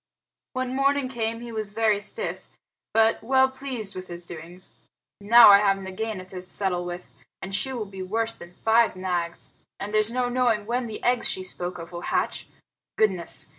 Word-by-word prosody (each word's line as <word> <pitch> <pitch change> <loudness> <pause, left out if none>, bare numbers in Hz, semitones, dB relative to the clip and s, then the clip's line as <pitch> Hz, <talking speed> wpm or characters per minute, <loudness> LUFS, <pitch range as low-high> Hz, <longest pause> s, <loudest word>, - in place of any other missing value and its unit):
When 255 0 -2
morning 275 -1 +2
came 230 -2 -2
he 240 -1 -7
was 215 -2 -4
very 220 -2 +2
stiff, 450 - -5 0.4
but 225 0 +3
well 265 +2 +4
pleased 260 -6 -6
with 185 0 -7
his 175 0 -7
doings. 175 +2 -10 0.5
"Now 225 +3 +8
I 200 0 +9
have 200 -1 +3
Nagaina 190 +1 -5
to 185 -1 -7
settle 180 -1 -1
with, 175 0 -7 0.3
and 195 - -7
she 265 +7 -1
will 240 -5 -3
be 195 -1 -9
worse 225 +4 -1
than 175 0 -12
five 225 +4 +3
Nags, 175 -2 -3 0.3
and 205 +2 -5
there's 215 0 +3
no 250 0 0
knowing 245 -4 +1
when 240 +2 -1
the 220 - -7
eggs 245 0 +2
she 185 - -2
spoke 180 -1 -5
of 170 0 -9
will 175 0 -6
hatch. - - -1 0.5
Goodness! 190 -6 +1
210 Hz, 180 wpm, -25 LUFS, 185-235 Hz, 0.5 s, I